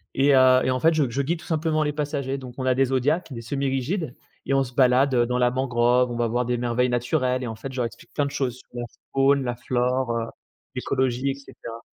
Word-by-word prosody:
et 140 0 +4
heu 130 0 +6
et 130 - +2
en 130 - 0
fait 165 +1 +4
je 145 -6 +1
je 135 +4 -1
guide 160 +4 -1
tout - - -13
simplement 155 -1 0
les 150 -1 -1
passagers. 145 -2 -2
Donc 125 -2 -9
on 130 - -3
a 130 - +3
des 135 +1 +3
zodiacs, 140 +6 0
des 115 - -6
semi 140 +4 -2
rigides 135 +2 -2 0.3
et 135 - 0
on 135 0 +3
se 125 - -11
balade, 130 +1 +4
heu, 120 - +4
dans 125 +1 -1
la 125 -1 +3
mangrove, 125 -1 +2
on 120 - -4
va 120 - +1
avoir 120 +2 0
des 125 0 0
merveilles 120 +1 0
naturelles 125 +1 0
et - - -3
en 110 - -5
fait 130 +5 -7
je 130 - -9
leur 120 - +1
explique 115 - -10
plein 145 - 0
de 140 - -4
choses, 125 -2 -2
sur - - -20
la 120 - -3 0.3
faune, 135 0 +3
la 120 - -2
flore, 125 +1 0
heu, 115 - -2 0.5
l'écologie 130 0 0
et 135 - -1
cetera. 115 -4 -10
130 Hz, 260 wpm, -24 LUFS, 120-140 Hz, 0.5 s, heu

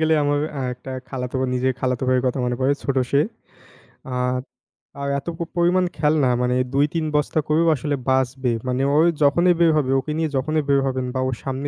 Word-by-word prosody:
গেলে 160 0 +3
আমার 145 0 +1
অ্যা 135 - -3
একটা 130 +2 -9 0.2
খালাতো 125 -1 -4 0.2
নিজে 125 +1 +1
খালাত 130 -2 -1
ভাইয়ের 130 0 +2
কথা 125 +2 0
মনে 125 0 -1
পড়ে, 130 +2 +3
ছোট 140 - -1
সে। 140 - +4 0.9
আ - - -2 0.9
আর 140 - -2
এত 140 - -17
প - - -28 0.2
পরিমাণ 180 +2 +3
খেলনা 150 -3 +2
মানে 125 0 +1 0.2
২-৩ 150 +4 +1
বস্তা 150 +1 +1
করেও 160 +2 +2
আসলে 145 +1 -2
বাঁচবে 130 -1 +1 0.2
মানে 125 +1 0
ও - - +4 0.3
যখনই 170 +5 +4
বের 170 -1 +5
হবে 135 -3 +1
ওকে 135 - -5
নিয়ে 160 -1 0
যখনই 155 +3 0
বের 140 0 +4
হবেন 130 -1 -1
বা - - 0
ওর 130 - -2
সামনে 135 +1 -3
140 Hz, 195 wpm, -22 LUFS, 130-155 Hz, 0.9 s, বের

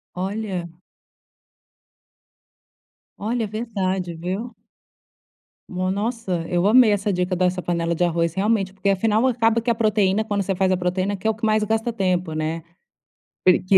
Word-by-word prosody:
Olha. 190 -2 -3 2.5
Olha, 225 +2 -1
verdade, 190 -5 -2
viu. 195 +8 -4 1.2
No 185 0 -1
nossa, 200 -5 -2
eu 175 +1 +1
amei 225 0 +6
essa 205 0 0
dica 180 0 0
dessa 180 0 +1
panela 170 -1 -1
de 170 - -5
arroz, 170 -1 +1
realmente, 195 -1 0
porque 200 0 -4
afinal, 215 +5 +2
acaba 230 -2 +2
que 235 +1 -2
a 230 - +3
proteína 215 -2 +2
quando 205 -2 -1
você 195 -1 -1
faz 190 0 +2
a 185 - +2
proteína, 185 +3 -1
que 220 - -3
é - - +4
o 220 - 0
que 225 0 -3
mais 215 0 +3
gasta 225 +2 0
tempo, 185 -5 0
né, 155 +1 -3 0.8
porque 185 +1 +5
195 Hz, 150 wpm, -22 LUFS, 180-220 Hz, 2.5 s, amei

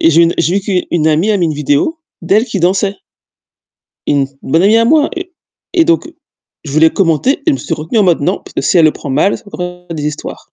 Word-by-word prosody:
et 165 - +4
j'ai 165 +2 +5
une 170 0 +2
j'ai 170 +2 +1
vu - - +1
qu'u 190 -3 0
une 160 -2 +1
amie 160 +7 +2
a 210 - +2
mis 175 -3 +1
une 155 - -2
vidéo 150 - 0 0.2
d'elle 200 +6 +2
qui 220 - -4
dansait. 195 +3 +1 1.1
Une 140 -2 +1 0.2
bonne 160 +5 +1
amie 210 +3 +4
à 230 - +3
moi 295 +4 +3
et 360 +1 -6 0.5
et 335 - +5
donc 330 -1 +1 0.6
je 145 - -7
voulais 160 +2 +4
commenter 195 - +1
et - - -34
je 315 - +5
me - - 0
suis 165 - -3
retenue 160 +9 -2
en 210 - +4
mode: 175 -5 +2
«Non, 180 +7 -1
parce - - -14
que - - -1
si 180 - +2
elle 165 - +5
le 155 - +4
prend 140 - -8
mal, 150 +9 +2
ça - - -17
va 205 - -15
encore 180 0 -6
faire 165 - -6
des 150 -1 -3
histoires». 150 0 -5
180 Hz, 270 wpm, -14 LUFS, 155-215 Hz, 1.1 s, j'ai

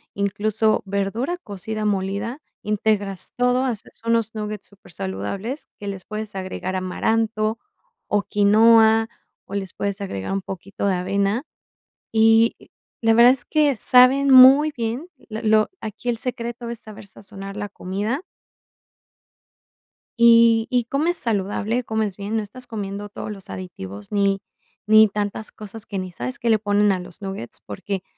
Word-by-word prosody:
incluso 210 +2 +1
verdura 200 - -2
cocida 215 - -5
molida. 200 +6 -2 0.2
Integras 205 -2 -1
todo, 250 +1 +2
haces 240 -6 -5
unos 230 -1 +1
nuggets 210 -2 -5
supersaludables 190 - -6
que 205 - -8
les 195 -2 -5
puedes 215 0 -6
agregar 185 0 -4
amaranto 215 +4 0 0.5
o 205 -1 +1
quinoa, 220 +2 +5 0.4
o - - -11
les 195 -3 -4
puedes 200 0 -3
agregar 100 - -4
un 195 - -1
poquito 195 +2 -5
de 190 - +2
avena. 200 +6 0 0.7
Y, 225 +1 +5 0.5
la 225 -1 +3
verdad 240 +2 +8
es 255 -2 -4
que 295 -4 +2
saben 255 +4 +5
muy 270 +4 +8
bien, 235 +7 -3 0.2
lo 220 +1 -4
lo 215 -1 +3
aquí 220 +2 -4
el 235 - -3
secreto 240 0 -5
es 235 -1 -6
saber 215 -2 -12
sazonar 195 0 -8
la 205 -1 -5
comida. 205 +11 -3 2.0
Y 230 -1 +6
y 250 -3 +1
comes 310 +8 0
saludable, 215 +2 -1
comes 220 -4 -2
bien, 205 +2 -4
no 220 - 0
estás 250 +5 -9
comiendo 205 -2 -5
todos 210 - -6
los 195 0 -10
aditivos 100 - -8
ni 200 -1 +1 0.5
ni 215 0 +7
tantas 205 +1 -4
cosas 215 +1 -10
que 200 - -4
ni 185 -1 -5
sabes 125 -6 -5
qué 235 - -1
le 220 -1 +4
ponen 205 0 +2
a 185 - 0
los 180 +1 -11
nuggets, 195 -11 -7
porque 190 - -5
215 Hz, 145 wpm, -22 LUFS, 195-230 Hz, 2.0 s, verdad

